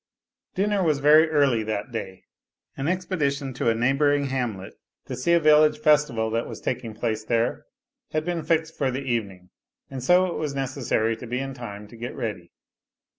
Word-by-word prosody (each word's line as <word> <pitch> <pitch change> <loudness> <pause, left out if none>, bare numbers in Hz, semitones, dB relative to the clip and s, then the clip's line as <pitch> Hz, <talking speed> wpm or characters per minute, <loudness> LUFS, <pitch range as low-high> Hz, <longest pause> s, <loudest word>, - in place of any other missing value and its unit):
Dinner 205 +1 +1
was 155 -5 +2
very 155 +3 +6
early 140 -7 +3
that 110 +2 -4
day. 95 -5 -6 0.5
An 135 - -3
expedition 150 -7 -1
to 120 - 0
a 115 - +2
neigh 120 +4 +2
bouring 145 0 +2
hamlet 115 -8 -3 0.3
to - - -5
see 170 +7 +1
a 170 - +5
village 150 -1 +5
festival 150 -7 +2
that 115 +1 -1
was - - -8
taking 115 -3 -4
place 110 -1 -2
there 115 +1 -1 0.4
had 155 0 -1
been 175 -1 -2
fixed 160 +1 0
for 135 - 0
the 130 +2 -3
evening, 100 -8 -3 0.4
and 130 -2 -6
so 180 +7 +5
it 180 - -3
was 150 -3 -3
necessary 125 -4 -1
to 125 - -9
be 125 +2 -2
in 135 +1 -4
time 105 -5 -8
to 120 - -14
get 120 +2 -6
ready. 90 -6 -5
135 Hz, 185 wpm, -25 LUFS, 115-150 Hz, 0.5 s, very